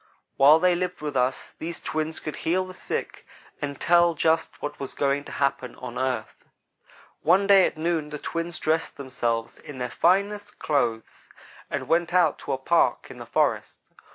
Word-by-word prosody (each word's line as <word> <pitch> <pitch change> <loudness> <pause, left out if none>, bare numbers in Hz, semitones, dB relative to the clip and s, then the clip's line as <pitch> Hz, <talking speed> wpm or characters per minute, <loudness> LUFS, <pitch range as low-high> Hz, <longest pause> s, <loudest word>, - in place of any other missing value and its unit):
While 145 +3 +7
they 180 +2 +3
lived 180 0 -3
with 150 -2 -4
us, 130 +1 0
these 170 +1 -5
twins 155 0 -3
could 155 - -6
heal 185 +3 0
the 185 - -10
sick - - -5 0.4
and 140 -1 -4
tell 170 0 +4
just 160 +1 +1
what 145 0 -5
was 135 - -6
going 140 0 0
to - - -9
happen 135 -3 -1
on 125 -1 -7
earth. 130 -1 -3 0.8
"One 185 +4 +4
day 195 -2 +6
at - - -7
noon 160 -2 -1
the 150 - -5
twins 165 +2 -4
dressed 160 +1 -1
themselves 120 -4 -3
in 145 - -10
their 125 -1 -3
finest 205 +3 +1
clothes 115 -7 -2 0.4
and - - -3
went 170 +1 +1
out 170 -5 +3
to - - -5
a - - 0
park 165 +6 +1
in - - -11
the - - -9
forest. - - -1
155 Hz, 180 wpm, -25 LUFS, 140-175 Hz, 0.8 s, While